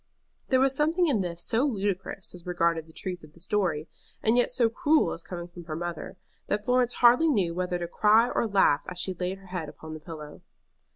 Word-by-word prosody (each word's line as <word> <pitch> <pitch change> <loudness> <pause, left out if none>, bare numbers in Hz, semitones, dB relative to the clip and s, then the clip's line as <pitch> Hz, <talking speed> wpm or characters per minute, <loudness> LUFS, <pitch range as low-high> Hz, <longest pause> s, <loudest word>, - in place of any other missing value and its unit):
There 260 - +3
was 270 0 +3
something 320 +5 +2
in 265 - +2
this 170 -2 -3
so 230 +3 +2
ludicrous 200 -7 -2
as 180 -1 -11
regarded 170 -2 0
the - - -15
truth 180 +1 -5
of 155 0 -15
the 170 - -19
story, 180 -5 -1 0.4
and 220 +2 +3
yet 245 - +2
so 245 -2 +4
cruel 295 +7 +2
as 170 - -7
coming 175 0 -7
from 175 -1 -12
her 155 -2 -5
mother, 175 +2 -5 0.3
that 210 0 -1
Florence 250 -1 +2
hardly 245 +7 +5
knew 195 - +1
whether 180 0 -1
to 175 -1 -4
cry 215 +6 +4
or 230 - 0
laugh 195 -8 +3
as 180 - -8
she 185 +1 -1
laid 180 +2 -3
her 195 - -17
head 165 -5 -3
upon 155 +1 -10
the 155 - -7
pillow. 150 -2 -9
185 Hz, 220 wpm, -27 LUFS, 170-235 Hz, 0.4 s, hardly